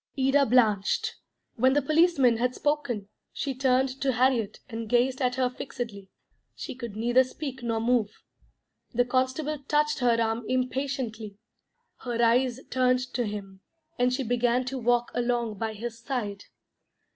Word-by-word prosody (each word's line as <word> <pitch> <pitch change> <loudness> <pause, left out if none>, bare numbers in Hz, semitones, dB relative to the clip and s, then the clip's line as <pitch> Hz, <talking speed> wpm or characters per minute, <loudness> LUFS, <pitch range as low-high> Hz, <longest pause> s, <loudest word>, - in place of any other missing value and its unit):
Ida 270 +1 +3
blanched. 215 -5 +2 0.4
When 260 +3 +4
the 290 - +3
policeman 310 -7 +4
had 250 +2 0
spoken, 280 -9 -1 0.2
she 275 - -3
turned 260 0 +1
to 270 -1 +2
Harriet, 240 -3 +1
and 225 -2 -6
gazed 255 +3 +2
at 250 -1 +1
her 260 -1 +2
fixedly. 235 -6 -6 0.5
She - - -6
could 235 -5 -7
neither 240 +4 +4
speak 265 0 -7
nor 230 -1 -1
move. 230 -2 +2 0.9
The 245 +1 +3
constable 260 +4 0
touched 300 0 +2
her 240 -2 +3
arm 225 +1 0
impatiently. 255 -5 -2 0.6
Her 240 -2 -4
eyes 240 +2 +3
turned 255 0 +1
to 240 -2 0
him, 195 -2 -7 0.4
and 250 0 +3
she 265 +2 -1
began 245 +1 +1
to 260 +1 -4
walk 240 0 +1
along 240 -3 -1
by 225 -1 -2
his 230 +2 -6
side. 230 -6 -4
245 Hz, 145 wpm, -27 LUFS, 230-260 Hz, 0.9 s, When